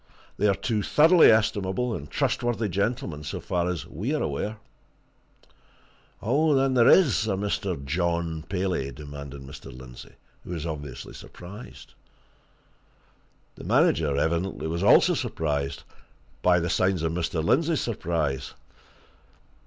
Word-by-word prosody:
They 105 Hz, -, +2 dB
are 100 Hz, -, +3 dB
two 105 Hz, +2 st, -1 dB
thoroughly 160 Hz, -, +6 dB
estimable 110 Hz, +1 st, +1 dB
and 75 Hz, -7 st, -6 dB
trustworthy 120 Hz, -2 st, 0 dB
gentlemen, 100 Hz, -, -2 dB
so -, -, -5 dB
far 90 Hz, 0 st, -1 dB
as 90 Hz, -4 st, -3 dB
we 110 Hz, -, -3 dB
are -, -, -1 dB
aware." 105 Hz, +10 st, -3 dB, 1.7 s
"Then 135 Hz, +2 st, +2 dB
there 120 Hz, -2 st, +5 dB
is 135 Hz, -, +5 dB
a 100 Hz, -, +1 dB
Mr. 95 Hz, -6 st, -2 dB
John 85 Hz, +1 st, -1 dB
Paley?" 90 Hz, -8 st, -1 dB
demanded 70 Hz, -1 st, -9 dB
Mr. 65 Hz, 0 st, -10 dB
Lindsey, 60 Hz, 0 st, -12 dB, 0.3 s
who -, -, -13 dB
was 80 Hz, -2 st, -4 dB
obviously 70 Hz, -4 st, -6 dB
surprised. 100 Hz, +7 st, -11 dB, 1.6 s
The -, -, -12 dB
manager, 75 Hz, -4 st, +2 dB
evidently, 85 Hz, +5 st, -1 dB
was 85 Hz, +2 st, -2 dB
also 100 Hz, -, +6 dB
surprised 70 Hz, -3 st, -2 dB, 0.6 s
by 90 Hz, -1 st, +4 dB
the 85 Hz, -, -2 dB
signs 95 Hz, -3 st, +1 dB
of 80 Hz, -, 0 dB
Mr. 85 Hz, -1 st, -2 dB
Lindsey's 155 Hz, -, +2 dB
surprise. 80 Hz, -, -2 dB
90 Hz, 125 wpm, -26 LUFS, 75-110 Hz, 1.7 s, thoroughly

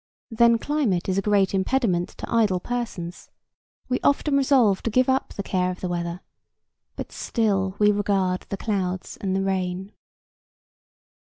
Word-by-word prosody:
Then 235 Hz, +1 st, +5 dB
climate 235 Hz, -, 0 dB
is 190 Hz, 0 st, +1 dB
a -, -, 0 dB
great 200 Hz, -2 st, +2 dB
impediment 190 Hz, -3 st, +1 dB
to -, -, -5 dB
idle 210 Hz, -6 st, +3 dB
persons; 195 Hz, -6 st, -5 dB, 0.6 s
we 255 Hz, 0 st, 0 dB
often 285 Hz, 0 st, +2 dB
resolve 260 Hz, -8 st, +3 dB
to -, -, -2 dB
give 255 Hz, +3 st, +3 dB
up 265 Hz, +1 st, 0 dB
the 200 Hz, -, -4 dB
care 185 Hz, -1 st, 0 dB
of 180 Hz, -, -5 dB
the 185 Hz, -, -3 dB
weather, 175 Hz, 0 st, -3 dB, 0.7 s
but -, -, -6 dB
still 195 Hz, -5 st, 0 dB
we 210 Hz, 0 st, +5 dB
regard 195 Hz, -3 st, 0 dB
the 200 Hz, -, -3 dB
clouds 185 Hz, -3 st, -2 dB
and 190 Hz, -1 st, -2 dB
the 195 Hz, -, 0 dB
rain. 190 Hz, 0 st, -2 dB
195 Hz, 155 wpm, -24 LUFS, 185-230 Hz, 0.7 s, Then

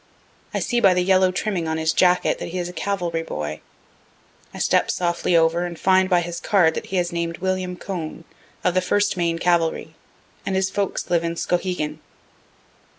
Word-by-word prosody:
I -, -, -2 dB
see 240 Hz, -, 0 dB
by 190 Hz, -5 st, +5 dB
the 180 Hz, -, +2 dB
yellow 185 Hz, 0 st, +4 dB
trimming 185 Hz, -3 st, -2 dB
on 160 Hz, 0 st, -1 dB
his 160 Hz, 0 st, +1 dB
jacket 180 Hz, -1 st, +3 dB
that -, -, -5 dB
he 180 Hz, -, -5 dB
is 175 Hz, -1 st, -2 dB
a 180 Hz, -, -8 dB
cavalry 175 Hz, -4 st, -2 dB
boy. 75 Hz, -, -5 dB, 0.9 s
I -, -, -10 dB
step -, -, +2 dB
softly 175 Hz, 0 st, +1 dB
over 165 Hz, +1 st, +3 dB
and 175 Hz, -1 st, -5 dB
find 190 Hz, 0 st, +3 dB
by 180 Hz, -2 st, +4 dB
his 170 Hz, 0 st, -5 dB
card 180 Hz, -6 st, +3 dB
that -, -, -5 dB
he 190 Hz, -, -2 dB
is 175 Hz, 0 st, 0 dB
named 170 Hz, -1 st, -3 dB
William 185 Hz, -1 st, -2 dB
Cone, 170 Hz, -4 st, -6 dB, 0.4 s
of 180 Hz, -, +2 dB
the 185 Hz, -, +3 dB
1st 205 Hz, +3 st, +1 dB
Maine 170 Hz, -2 st, 0 dB
cavalry, 165 Hz, -2 st, 0 dB, 0.5 s
and 190 Hz, -, -2 dB
his 190 Hz, 0 st, +1 dB
folks 200 Hz, -3 st, -2 dB
live 170 Hz, -1 st, +2 dB
in 170 Hz, 0 st, -2 dB
Skowhegan. 175 Hz, -4 st, -2 dB
175 Hz, 190 wpm, -22 LUFS, 165-185 Hz, 0.9 s, by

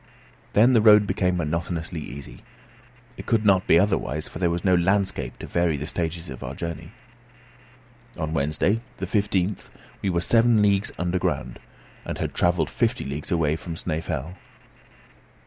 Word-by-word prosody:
Then 120 Hz, +5 st, +5 dB
the 115 Hz, -, +5 dB
road 105 Hz, -1 st, +7 dB
became 90 Hz, -2 st, 0 dB
monotonously 85 Hz, +1 st, -3 dB
easy. 70 Hz, -2 st, -9 dB, 0.8 s
It -, -, -9 dB
could 110 Hz, -2 st, +1 dB
not 95 Hz, -2 st, +4 dB
be 80 Hz, -, +6 dB
otherwise, 85 Hz, -6 st, 0 dB
for -, -, -9 dB
there 90 Hz, -2 st, +2 dB
was 85 Hz, +2 st, -3 dB
no 95 Hz, -, +4 dB
landscape 90 Hz, -7 st, +1 dB
to -, -, -8 dB
vary 85 Hz, -3 st, 0 dB
the 75 Hz, -, -5 dB
stages 85 Hz, +1 st, -3 dB
of 65 Hz, -, -9 dB
our 70 Hz, +3 st, -6 dB
journey. 85 Hz, +1 st, -6 dB, 1.3 s
On 80 Hz, -1 st, -3 dB
Wednesday, 75 Hz, +9 st, +1 dB, 0.2 s
the -, -, -3 dB
15th, 100 Hz, -2 st, -1 dB, 0.3 s
we 100 Hz, -, 0 dB
were 85 Hz, -2 st, +1 dB
seven 115 Hz, +2 st, +4 dB
leagues 100 Hz, 0 st, +2 dB
underground, 90 Hz, 0 st, -2 dB, 0.4 s
and -, -, -5 dB
had -, -, -3 dB
travelled 85 Hz, -3 st, +1 dB
fifty -, -, 0 dB
leagues 70 Hz, +2 st, -5 dB
away 80 Hz, -3 st, +1 dB
from 85 Hz, 0 st, -7 dB
Snæfell. 80 Hz, +1 st, -4 dB
85 Hz, 155 wpm, -24 LUFS, 80-100 Hz, 1.3 s, road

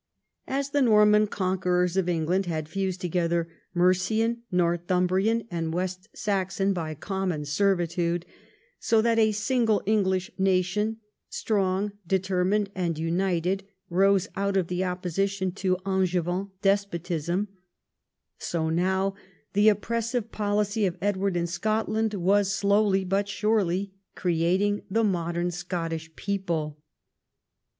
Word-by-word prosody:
As 275 Hz, +1 st, -2 dB
the 290 Hz, -1 st, +2 dB
Norman 210 Hz, -3 st, +5 dB
conquerors 180 Hz, -2 st, 0 dB
of 190 Hz, -2 st, +1 dB
England 175 Hz, +3 st, 0 dB
had 155 Hz, -3 st, -2 dB
fused 190 Hz, +1 st, -2 dB
together 170 Hz, -1 st, 0 dB, 0.3 s
Mercian, 215 Hz, +6 st, +2 dB
Northumbrian, 180 Hz, +5 st, +1 dB
and 165 Hz, -1 st, -2 dB
West 185 Hz, +3 st, -3 dB
Saxon 195 Hz, -1 st, 0 dB
by 160 Hz, -4 st, -4 dB
common 185 Hz, -3 st, -3 dB
servitude, 175 Hz, +1 st, 0 dB, 0.5 s
so 225 Hz, -2 st, +2 dB
that 230 Hz, -1 st, +3 dB
a 220 Hz, -1 st, +4 dB
single 220 Hz, 0 st, +1 dB
English 190 Hz, -1 st, +1 dB
nation, 190 Hz, +3 st, +1 dB, 0.3 s
strong, 200 Hz, -1 st, 0 dB, 0.2 s
determined, 190 Hz, +2 st, +1 dB
and 175 Hz, -4 st, -2 dB
united, 180 Hz, +3 st, 0 dB, 0.3 s
rose 195 Hz, +2 st, +3 dB
out 200 Hz, 0 st, 0 dB
of 180 Hz, -3 st, 0 dB
the 180 Hz, +1 st, -1 dB
opposition 185 Hz, +1 st, -1 dB
to 185 Hz, 0 st, 0 dB
AngeAan 185 Hz, 0 st, 0 dB
despotism, 185 Hz, -2 st, 0 dB, 0.9 s
so 160 Hz, -2 st, -1 dB
now 190 Hz, +3 st, +1 dB, 0.4 s
the 205 Hz, +2 st, +6 dB
oppressive 230 Hz, +2 st, -1 dB
policy 205 Hz, 0 st, 0 dB
of 180 Hz, 0 st, -4 dB
Edward 195 Hz, -1 st, 0 dB
in 170 Hz, -, 0 dB
Scotland 215 Hz, +4 st, -1 dB
Avas 200 Hz, +1 st, +2 dB
slowly 200 Hz, 0 st, +2 dB
but 195 Hz, +2 st, 0 dB
surely 200 Hz, -3 st, 0 dB, 0.2 s
creating 185 Hz, +4 st, +1 dB
the 225 Hz, +4 st, +1 dB
modem 175 Hz, -3 st, 0 dB
Scottish 165 Hz, -2 st, -4 dB
people. 165 Hz, -7 st, -3 dB
190 Hz, 115 wpm, -26 LUFS, 175-205 Hz, 0.9 s, the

